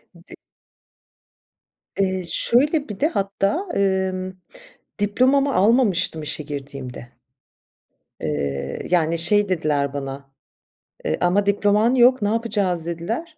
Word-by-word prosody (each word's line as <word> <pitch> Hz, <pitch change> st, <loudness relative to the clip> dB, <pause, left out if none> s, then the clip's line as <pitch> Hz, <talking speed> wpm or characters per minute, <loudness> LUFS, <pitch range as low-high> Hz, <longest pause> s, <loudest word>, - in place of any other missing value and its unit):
D 170 Hz, +1 st, -14 dB, 1.6 s
Eee, 190 Hz, -2 st, 0 dB
şöyle, 285 Hz, +3 st, +2 dB
bir 205 Hz, -, -7 dB
de 300 Hz, -, +3 dB
hatta, 200 Hz, -, -1 dB
emm, 190 Hz, -1 st, 0 dB, 0.7 s
diplomamı 260 Hz, +7 st, +2 dB
almamıştım 205 Hz, -7 st, +2 dB
işe 150 Hz, +1 st, -3 dB
girdiğimde. 140 Hz, -4 st, -8 dB, 1.1 s
Eee, 70 Hz, -2 st, -3 dB
yani 170 Hz, -2 st, +2 dB
şey 205 Hz, +4 st, +2 dB
dediler 145 Hz, -5 st, 0 dB
bana, 135 Hz, -1 st, -6 dB, 0.7 s
eee, 80 Hz, -, 0 dB
"Ama 195 Hz, +3 st, +2 dB
diploman 205 Hz, +4 st, +2 dB
yok, 250 Hz, +1 st, +5 dB
ne 205 Hz, -, +1 dB
yapacağız?" 205 Hz, -7 st, -1 dB
dediler. 225 Hz, -, -4 dB
190 Hz, 105 wpm, -22 LUFS, 155-225 Hz, 1.6 s, yok